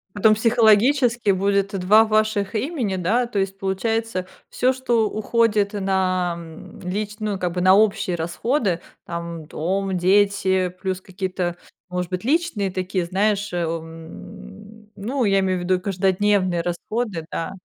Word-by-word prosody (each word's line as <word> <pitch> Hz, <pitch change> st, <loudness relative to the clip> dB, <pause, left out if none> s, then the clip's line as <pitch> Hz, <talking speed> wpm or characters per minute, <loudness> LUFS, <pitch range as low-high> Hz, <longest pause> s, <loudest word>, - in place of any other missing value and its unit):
Потом, 215 Hz, +1 st, +4 dB
психологически 230 Hz, +1 st, +3 dB
будет 200 Hz, +1 st, 0 dB
два 210 Hz, +5 st, +6 dB
ваших 215 Hz, -2 st, +1 dB
имени, 235 Hz, -, -1 dB
да, 225 Hz, +8 st, +1 dB
то 215 Hz, -4 st, -2 dB
есть, 195 Hz, 0 st, -2 dB
получается, 195 Hz, 0 st, -2 dB, 0.2 s
всё, 255 Hz, +1 st, +1 dB
что 240 Hz, -4 st, +1 dB
уходит 215 Hz, -2 st, +1 dB
на, 185 Hz, -3 st, 0 dB
м, 165 Hz, -1 st, -11 dB
лич 210 Hz, +3 st, -3 dB
ну, 210 Hz, -3 st, -2 dB
как 180 Hz, -2 st, -2 dB
бы 180 Hz, -, -2 dB
на 185 Hz, +1 st, +6 dB
общие 200 Hz, -4 st, +2 dB
расходы, 180 Hz, -, -1 dB, 0.2 s
там, 170 Hz, -2 st, -6 dB
дом, 190 Hz, +4 st, -2 dB
дети, 190 Hz, 0 st, +2 dB
плюс 190 Hz, -1 st, -2 dB
какие-то, 185 Hz, -2 st, -3 dB, 0.3 s
может 180 Hz, 0 st, -3 dB
быть, 185 Hz, +3 st, -3 dB
личные 270 Hz, -, 0 dB
такие, 185 Hz, -1 st, -2 dB
знаешь, 200 Hz, +2 st, 0 dB
эм, 170 Hz, +5 st, -7 dB
ну, 245 Hz, +6 st, -2 dB
я 195 Hz, -2 st, +3 dB
имею 185 Hz, -1 st, 0 dB
в -, -, -5 dB
виду 180 Hz, 0 st, +1 dB
каждодневные 190 Hz, -1 st, +1 dB
расходы, 175 Hz, +1 st, -3 dB
да. 165 Hz, -, -3 dB
195 Hz, 140 wpm, -22 LUFS, 180-215 Hz, 0.3 s, два